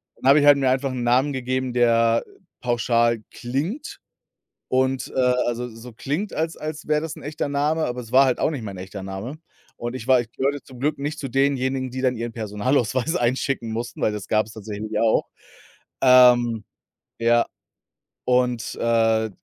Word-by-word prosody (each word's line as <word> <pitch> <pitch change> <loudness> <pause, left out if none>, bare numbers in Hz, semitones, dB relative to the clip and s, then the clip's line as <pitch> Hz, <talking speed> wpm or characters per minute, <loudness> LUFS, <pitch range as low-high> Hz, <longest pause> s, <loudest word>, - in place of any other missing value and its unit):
dann 135 - +1
habe 145 +2 +7
ich 145 - +2
halt 145 -1 +8
mir 135 -2 +2
einfach 130 +1 0
'n 125 -2 -3
Namen 130 +4 +3
gegeben, 130 -1 -2
der 115 -1 +3 0.4
pauschal 120 -1 +1
klingt 155 - -4 0.7
und, 130 0 0
äh, - - +1 0.3
also 120 +1 -2
so 115 +2 -11
klingt 150 - -3
als 160 +1 -2
als 155 -1 -6
wäre 150 0 +2
das 160 -2 -5
'n - - -11
echter 145 -1 -3
Name, 150 +3 +1
aber 125 0 -3
es 115 - -12
war 135 +1 +7
halt 130 -2 0
auch - - +1
nicht 135 -6 -5
mein 100 -3 -6
echter 95 +1 -8
Name. 100 +10 -6 0.4
Und 120 +1 -5
ich 130 -1 -7
war 130 -2 +5
ich 115 -1 -11
gehörte 140 +1 -2
zum 130 -2 -14
Glück 150 +2 0
nicht 150 +3 -4
zu 140 - -4
denjenigen, 130 -1 0
die 130 +1 -4
dann 130 -1 +1
ihren 115 +1 -4
Personalausweis 120 - 0
einschicken 120 -2 -1
mussten, 115 +2 -5
weil - - +2
das 105 -2 -6
gab's 110 0 0
tatsächlich 110 0 -5
auch 115 -1 +2 0.7
ähm, 125 -3 +6 0.6
ja 115 0 +3 0.8
und, 125 -2 +1
äh, 115 -1 +2
125 Hz, 180 wpm, -23 LUFS, 115-135 Hz, 0.8 s, halt